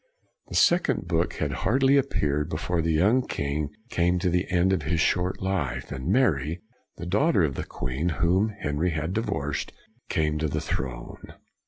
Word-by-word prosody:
The - - -7
second 170 -8 +3
book 85 -1 0
had - - -2
hardly 135 +5 +2
appeared 75 - +1
before 85 +2 -1
the 80 0 0
young 100 +11 +4
king 70 +1 -2 0.2
came 90 +1 +2
to 90 0 0
the 90 +1 0
end 90 +1 +3
of 90 - 0
his 80 +3 -1
short 90 +2 +1
life, 95 -8 -2
and 65 +3 -5
Mary, 85 - +2 0.4
the - - -6
daughter 105 - +2
of 70 -4 +1
the - - -4
queen 65 +8 -3
whom 90 +6 +2
Henry 75 +4 0
had 80 +2 -2
divorced, 75 -10 -2 0.4
came 75 -2 0
to 80 - 0
the 70 - -2
throne. 60 -2 -5
85 Hz, 170 wpm, -26 LUFS, 75-95 Hz, 0.4 s, young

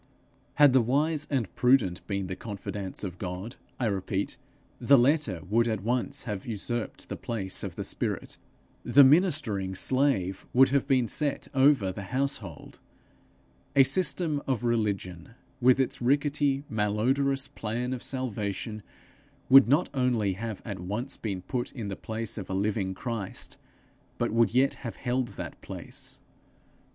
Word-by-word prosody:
Had 145 -3 +6
the 130 - +6
wise 145 +6 +1
and 130 -8 -1
prudent 125 -9 +3
been 100 -2 -2
the 95 0 -4
confidants 100 -1 -6
of 90 -3 -5
God, 95 +5 -5 0.2
I 125 - 0
repeat, 100 -1 -1 0.4
the 140 - +6
letter 125 - +2
would 115 +4 +2
at 110 -4 -2
once 125 +4 -1
have 105 -3 -5
usurped 115 +1 -4
the - - -4
place 100 -5 -4
of - - -5
the - - -4
spirit; - - -4 0.4
the 140 - +7
ministering 130 - +3
slave 105 -7 +1
would 130 +2 +6
have 140 0 +1
been 130 -4 +3
set 145 +6 -1
over 135 -8 +4
the 100 - -7
household; 140 +2 -3 1.0
a 135 - +8
system 150 -1 0
of 130 -4 0
religion, 105 -5 -2 0.3
with 130 +2 +5
its 130 - 0
rickety, 140 +1 +1
malodorous 130 +6 +1
plan 125 -1 -3
of 125 - -5
salvation, 110 -4 -3 0.7
would 135 -1 +9
not 145 +8 +3
only 120 -7 +1
have 110 +2 -6
at 100 -5 -5
once 105 +10 -3
been 95 -5 -4
put 125 +4 -3
in 115 -6 -5
the 95 - -4
place 110 +1 -5
of 95 - -8
a 95 - -2
living 100 -1 -1
Christ, 115 -3 -4 0.6
but - - 0
would 115 0 +3
yet 130 +3 +3
have 120 -4 -5
held 125 0 -1
that - - -7
place. - - -7
120 Hz, 150 wpm, -28 LUFS, 100-135 Hz, 1.0 s, would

